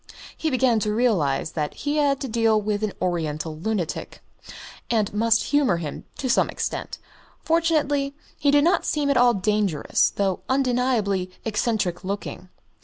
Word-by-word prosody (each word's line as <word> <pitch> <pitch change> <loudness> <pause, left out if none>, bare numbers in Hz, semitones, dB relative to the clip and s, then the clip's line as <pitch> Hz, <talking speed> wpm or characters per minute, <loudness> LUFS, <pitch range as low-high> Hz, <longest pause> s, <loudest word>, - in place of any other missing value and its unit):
He 320 - -1
began 255 -4 +2
to 210 0 -1
realise 180 - +1
that 150 -2 -3
he 290 +1 -2
had 280 -2 +2
to 270 - -2
deal 225 -2 +2
with 210 0 -2
an 215 -2 -1
Oriental 160 -3 -2
lunatic, 175 0 -3 0.7
and 215 -4 +1
must 225 +1 +3
humour 280 -11 +2
him 155 -4 -6
to 265 - -3
some 250 - +3
extent. - - -4 0.5
Fortunately 300 -4 +1 0.2
he 285 - +2
did 285 0 +5
not 345 +4 +3
seem 290 -2 0
at 275 - +2
all 245 -1 +5
dangerous, 200 -5 +1
though 195 -2 -1
undeniably 245 -8 +1 0.2
eccentric 210 -5 -1
looking. 195 -1 -5
220 Hz, 150 wpm, -24 LUFS, 190-270 Hz, 0.7 s, did